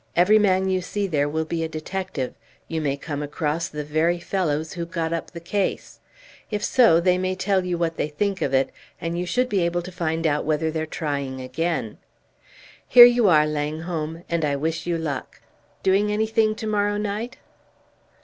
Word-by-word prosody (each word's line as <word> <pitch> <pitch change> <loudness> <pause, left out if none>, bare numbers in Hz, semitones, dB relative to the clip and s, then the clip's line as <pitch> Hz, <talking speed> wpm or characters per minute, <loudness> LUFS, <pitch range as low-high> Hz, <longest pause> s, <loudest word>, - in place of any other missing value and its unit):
Every 200 +5 +5
man 190 -2 +3
you 185 -1 +1
see 200 +3 -2
there 145 -6 0
will 160 +1 -1
be 165 0 -2
a 160 - -3
detective; 160 -3 -4 0.3
you 160 -1 -2
may 140 -2 -1
come 145 0 -5
across 150 +3 -2
the 150 0 -5
very 155 +4 +1
fellows 160 -4 -1
who 170 - -4
got 165 -1 -2
up 165 - -3
the 170 - -8
case; 190 +4 -2 0.5
if 210 -2 -3
so, 230 -10 +5
they 180 +1 +2
may 185 0 -1
tell 190 0 +1
you 180 -1 -2
what 165 -1 -1
they - - 0
think 195 +6 -2
of 135 - 0
it, 135 0 +2 0.3
and 165 0 -3
you 175 +1 -2
should 250 +8 +1
be 205 -5 0
able 170 0 0
to 185 - -8
find 165 -2 -2
out 150 -1 +1
whether 155 +1 0
they're 160 0 -3
trying 140 -4 -3
again. 130 -2 -3 0.9
Here 240 -1 +11
you 240 -4 +4
are, 155 -3 +5
Langholm, 155 +2 -3
and 170 -1 -1
I 145 -2 +1
wish 160 +4 -2
you 170 -1 0
luck. 145 -5 -5 0.4
Doing 200 +2 +3
anything 220 0 +1
to 220 0 -6
morrow 205 -1 +1
night?" 210 +4 -3
170 Hz, 190 wpm, -23 LUFS, 155-190 Hz, 0.9 s, Here